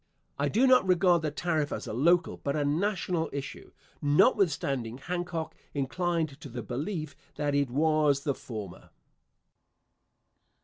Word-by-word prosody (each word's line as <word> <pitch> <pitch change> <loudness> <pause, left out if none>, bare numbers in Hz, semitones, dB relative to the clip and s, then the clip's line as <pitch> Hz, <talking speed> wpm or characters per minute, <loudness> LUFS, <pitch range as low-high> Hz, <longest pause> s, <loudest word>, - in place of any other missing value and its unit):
I - - +1
do 240 +5 +3
not 255 -4 +6
regard 180 -2 +4
the 155 - -1
tariff 155 0 -1
as 105 - -4
a - - -5
local, 170 +8 +2
but 140 +1 -2
a 150 -1 0
national 170 +1 0
issue, 140 0 -6 0.3
notwithstanding 145 - +2
Hancock 175 +2 -4 0.2
inclined 155 +1 -1
to 140 - -8
the 120 -1 -6
belief 155 - -4 0.2
that 145 -1 -1
it 140 -2 +1
was 150 0 +2
the 140 - 0
former. 105 -8 -8
150 Hz, 135 wpm, -29 LUFS, 140-175 Hz, 0.3 s, not